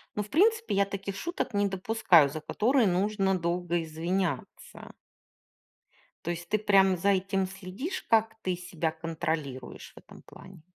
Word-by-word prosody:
ну, 210 - -1
в 210 - -13
принципе, 445 - +2
я 200 0 +3
таких 200 0 -5
шуток 340 - -3
не 205 0 +2
допускаю, 190 -5 +3
за 155 - -5
которые 230 - +2
нужно 190 +1 +1
долго 175 0 -1
извиняться. 165 0 -4 1.3
То 170 - -2
есть 175 0 -7
ты 215 - +2
прям 195 -3 +4
за 200 +4 +1
этим 195 0 +1
следишь, 190 - -6
как 225 0 +3
ты 185 -3 -1
себя 170 -2 -3
контролируешь 155 -5 -5
в - - -36
этом - - -14
плане? 185 -4 -14
190 Hz, 150 wpm, -28 LUFS, 170-205 Hz, 1.3 s, прям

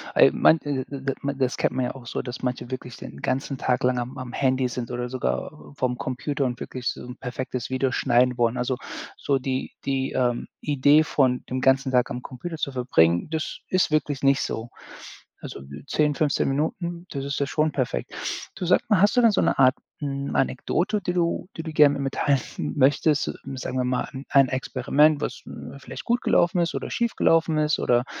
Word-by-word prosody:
Ey, - - +7
man, 160 - +5
d 145 -4 -3
d 135 -1 -3 0.2
das 130 -1 0
kennt - - +1
man 130 -1 +1
ja - - -3
auch 125 -3 -11
so, - - -3
dass 125 0 -6
manche 125 -1 -3
wirklich 125 -1 -6
den 70 0 -10
ganzen 135 +1 -1
Tag 125 0 0
lang 125 0 +2
am 120 +1 -5
am 130 -1 -7
Handy 130 -1 +1
sind 120 -1 -5
oder 125 0 -3
sogar 65 - -2 0.3
vorm 125 -1 0
Computer 135 +2 -2
und 125 -2 -3
wirklich 125 -1 -5
so - - -3
'n 125 +1 -9
perfektes 125 -1 -4
Video 130 0 0
schneiden 125 0 +3
wollen. 120 +1 +2
Also, 125 +1 -1 0.4
so 140 -1 0
die 130 0 -3
die, 135 -1 0
ähm, 120 -2 0
Idee 145 +1 +4
von 130 -5 +1
dem 130 0 -1
ganzen 135 +1 +3
Tag 125 -1 +3
am 125 - -5
Computer 160 +6 -6
zu 140 - -2
verbringen, 85 - +2
das 160 -1 -3
ist 185 -3 +2
wirklich 150 -3 0
nicht 135 0 +4
so. 115 +2 -3 0.7
Also, - - -8 0.3
10, 150 -2 +1
15 145 -2 +1
Minuten, 170 +5 -2
das 140 -2 -4
ist 140 0 -2
ja 140 - +1
schon 155 +1 +1
perfekt. 130 -4 -2 0.4
Du, 180 - -4
sag 180 - +4
mal, 210 -5 +4
hast 205 +4 +4
du - - +7
denn 230 - +6
so - - +2
'ne - - +2
Art, 130 -1 +6 0.2
hm, 140 -1 -3
Anekdote, 190 - 0
die 180 - -2
du 170 0 0
die - - -2
du 160 - -5
gerne 150 -1 +6
mit 140 - -3
mir 135 - 0
teilen 140 -3 -1
möchtest? 145 +2 +3 0.2
Sagen 130 0 -4
wir 130 - +1
mal, 125 0 -1
'n 135 +1 -7
ein 135 -1 +5
Experiment, 140 +3 +2
was - - -4 0.4
vielleicht - - -9
gut 240 +1 +1
gelaufen 175 +1 +3
ist 170 - 0
oder - - -4
schiefgelaufen 165 -9 +2
ist 150 0 +2
oder 120 0 +2
135 Hz, 205 wpm, -25 LUFS, 125-150 Hz, 0.7 s, Ey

